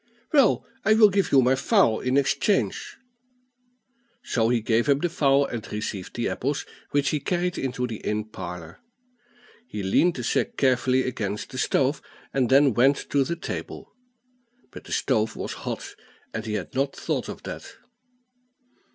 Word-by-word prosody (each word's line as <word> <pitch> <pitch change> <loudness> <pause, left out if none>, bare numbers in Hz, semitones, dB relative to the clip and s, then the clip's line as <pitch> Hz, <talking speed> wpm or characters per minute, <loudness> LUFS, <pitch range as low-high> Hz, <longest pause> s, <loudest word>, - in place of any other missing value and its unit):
Well, 275 -7 +4 0.2
I 215 +1 +4
will 215 -2 +7
give 195 0 +1
you 135 -2 +6
my 125 +2 +4
fowl 135 - +3
in 130 +2 0
exchange." 140 +8 0 1.3
So 115 -2 +1
he 120 -1 +2
gave 115 +4 +1
up 140 0 +3
the 175 - +2
fowl, 140 -3 +3
and 115 -5 -6
received 105 -3 -5
the 120 - -1
apples, 140 +3 -2 0.2
which 145 0 +1
he 150 - 0
carried 180 +4 -1
into 125 -1 -2
the 115 -3 -5
inn 105 0 -2
parlor. 90 -5 -8 0.9
He 105 - -5
leaned 165 - +3
the 125 - -5
sack - - 0
carefully 130 -1 +2
against 105 -4 -4
the 130 - -5
stove, 135 +2 +1 0.3
and 130 -4 +1
then 135 -1 +5
went 135 +5 +2
to 140 -1 +3
the 170 +5 -2
table. 170 - -7 0.8
But - - -11
the - - -11
stove 110 -4 +1
was - - -4 0.2
hot, - - -5 0.4
and 110 +1 -4
he 105 - -2
had 100 - -5
not 135 +1 -1
thought - - -3
of - - -8
that. - - -7
130 Hz, 165 wpm, -25 LUFS, 110-145 Hz, 1.3 s, will